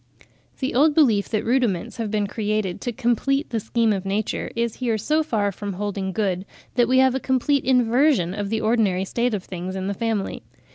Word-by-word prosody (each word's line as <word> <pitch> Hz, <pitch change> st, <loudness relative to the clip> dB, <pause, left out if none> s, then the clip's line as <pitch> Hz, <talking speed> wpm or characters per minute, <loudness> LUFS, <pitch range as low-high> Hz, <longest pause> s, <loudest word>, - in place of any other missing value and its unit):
The 265 Hz, -, -2 dB
old 290 Hz, +4 st, +4 dB
belief 225 Hz, -10 st, +3 dB
that 215 Hz, -1 st, -1 dB
rudiments 235 Hz, -8 st, 0 dB
have 225 Hz, -2 st, -2 dB
been 210 Hz, -1 st, 0 dB
created 210 Hz, -3 st, -2 dB
to 245 Hz, -, -2 dB
complete 265 Hz, +4 st, 0 dB
the 230 Hz, -, 0 dB
scheme 225 Hz, 0 st, +1 dB
of 195 Hz, -2 st, -3 dB
nature 200 Hz, +2 st, -2 dB
is 235 Hz, -1 st, -1 dB
here 235 Hz, -4 st, 0 dB
so 305 Hz, +9 st, +1 dB
far 215 Hz, -9 st, 0 dB
from 200 Hz, +1 st, -5 dB
holding 195 Hz, 0 st, -3 dB
good, 190 Hz, -3 st, -1 dB, 0.3 s
that 240 Hz, -2 st, +3 dB
we 260 Hz, +2 st, +3 dB
have 260 Hz, -1 st, +5 dB
a 265 Hz, -, -1 dB
complete 265 Hz, +2 st, +1 dB
inversion 250 Hz, -, +3 dB
of 205 Hz, 0 st, -3 dB
the 220 Hz, 0 st, -1 dB
ordinary 215 Hz, -5 st, +1 dB
state 235 Hz, +3 st, 0 dB
of 190 Hz, -, -5 dB
things 185 Hz, +1 st, -6 dB
in 190 Hz, 0 st, -3 dB
the 200 Hz, -, -1 dB
family. 220 Hz, -1 st, -2 dB
220 Hz, 200 wpm, -23 LUFS, 200-250 Hz, 0.3 s, have